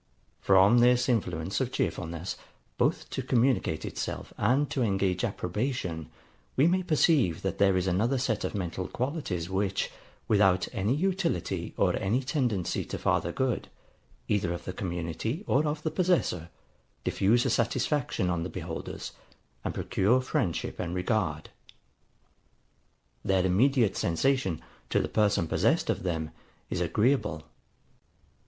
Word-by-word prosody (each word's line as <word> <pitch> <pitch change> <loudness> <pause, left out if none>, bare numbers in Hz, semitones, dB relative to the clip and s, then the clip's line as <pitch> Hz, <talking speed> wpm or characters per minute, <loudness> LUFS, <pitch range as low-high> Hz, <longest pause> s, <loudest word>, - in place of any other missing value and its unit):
From 100 +5 +5
this 125 +1 +4
influence 95 -6 0
of - - -1
cheerfulness, 85 +3 -2 0.4
both - - +1
to - - -2
communicate 125 - +1
itself - - -5
and 130 +7 +2
to 135 - -1
engage 95 -4 +1
approbation, 100 - -2 0.5
we 135 - +4
may 185 +3 +3
perceive 155 - +2
that 95 -2 -2
there 95 -2 +4
is 90 - 0
another 105 +9 +1
set 120 -4 -1
of - - -3
mental 90 -1 -3
qualities, 125 - -3
which, 95 +1 -1 0.4
without 95 -4 +3
any 110 +3 +1
utility 180 - -1
or - - +3
any 115 +8 0
tendency 125 - 0
to - - -5
farther - - +1
good, 130 -2 -1 0.6
either 95 -4 +1
of 85 - -5
the 95 - -4
community 90 - -3
or 150 +3 +2
of 150 +1 -3
the 160 - -1
possessor, 160 - +1 0.5
diffuse 115 +5 +2
a - - +2
satisfaction 125 -2 0
on 85 -1 -1
the 90 - -3
beholders, 85 -2 -6 0.5
and - - -3
procure 110 +7 +2
friendship 130 - -2
and 85 0 -3
regard. 90 -5 -1 1.7
Their 95 -1 +2
immediate 115 +4 +3
sensation, 95 - +1 0.3
to - - +2
the - - 0
person 105 -5 +2
possessed - - +2
of - - -3
them, 80 -4 -2 0.4
is - - -1
agreeable. 105 - +1
105 Hz, 135 wpm, -28 LUFS, 90-130 Hz, 1.7 s, From